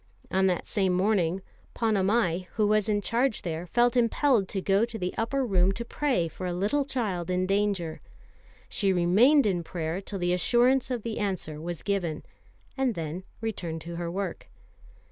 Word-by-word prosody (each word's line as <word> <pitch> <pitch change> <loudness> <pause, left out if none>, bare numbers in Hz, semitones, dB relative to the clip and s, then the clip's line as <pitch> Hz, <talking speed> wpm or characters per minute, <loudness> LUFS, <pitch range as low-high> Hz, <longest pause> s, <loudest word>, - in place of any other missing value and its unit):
On 190 0 +3
that 180 -2 0
same 190 -4 +1
morning, 185 -2 +1 0.3
Ponnamal, 200 -4 +1
who 215 - +2
was 215 0 +2
in 205 -1 +1
charge 235 +3 0
there, 170 0 -4
felt 240 +5 +2
impelled 240 -2 +3
to 195 - -3
go 195 +2 +2
to 235 -1 -3
the 180 -3 -3
upper 260 +4 0
room 190 -4 +3
to 235 +4 -5
pray 250 - 0
for 180 +3 -6
a 175 - -2
little 210 +11 0
child 200 -10 -2
in 180 0 +1
danger. 195 -4 0 0.7
She 195 -2 +1
remained 210 - +5
in 185 -4 +1
prayer 165 +2 -3
till 200 +1 -6
the 175 -1 0
assurance 245 +8 +3
of 245 -4 -3
the 230 -2 -3
answer 180 -7 -3
was 170 0 -5
given, 180 -6 -1 0.5
and 265 -4 0
then 165 +3 -5 0.2
returned 175 -8 -4
to 170 +1 -7
her 170 -1 -3
work. 185 0 -4
195 Hz, 175 wpm, -27 LUFS, 175-230 Hz, 0.7 s, remained